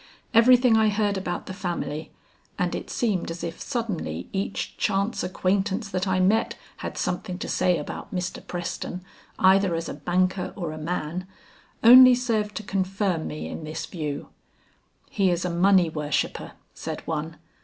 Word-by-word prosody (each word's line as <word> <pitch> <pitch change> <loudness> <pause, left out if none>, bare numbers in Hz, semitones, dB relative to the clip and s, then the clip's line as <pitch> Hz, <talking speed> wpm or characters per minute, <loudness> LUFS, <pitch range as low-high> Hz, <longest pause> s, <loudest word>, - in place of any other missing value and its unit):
Everything 240 0 +6
I 220 -1 +4
heard 205 -1 +1
about 180 -2 -3
the - - -6
family 170 -4 -4 0.5
and - - 0
it - - -5
seemed 210 -9 -1
as 165 +1 -6
if 165 -1 -5
suddenly 180 - -3
each 195 0 -3
chance 200 +4 0
acquaintance 190 +4 0
that 185 0 -2
I 185 0 +1
met 205 +5 +2 0.2
had - - -6
something 180 0 -2
to - - -5
say 180 -1 +2
about 150 - -6
Mr. 185 -1 -4
Preston 180 +1 -4 0.3
either 190 -1 +4
as 165 0 -3
a - - -4
banker 185 +1 0
or 170 -5 -4
a 155 - -7
man, 170 +2 -3 0.6
only 255 +2 +10
served 220 -4 -1
to 215 - -4
confirm 195 -3 -1
me 150 - -5
in - - -6
this 155 +1 -5
view. 150 -5 -5 0.8
"He 195 -2 +2
is 175 0 0
a 180 - -1
money 180 +1 +4
worshipper," 150 -2 -2 0.2
said - - -6
one. 160 0 -3
185 Hz, 160 wpm, -25 LUFS, 170-205 Hz, 0.8 s, only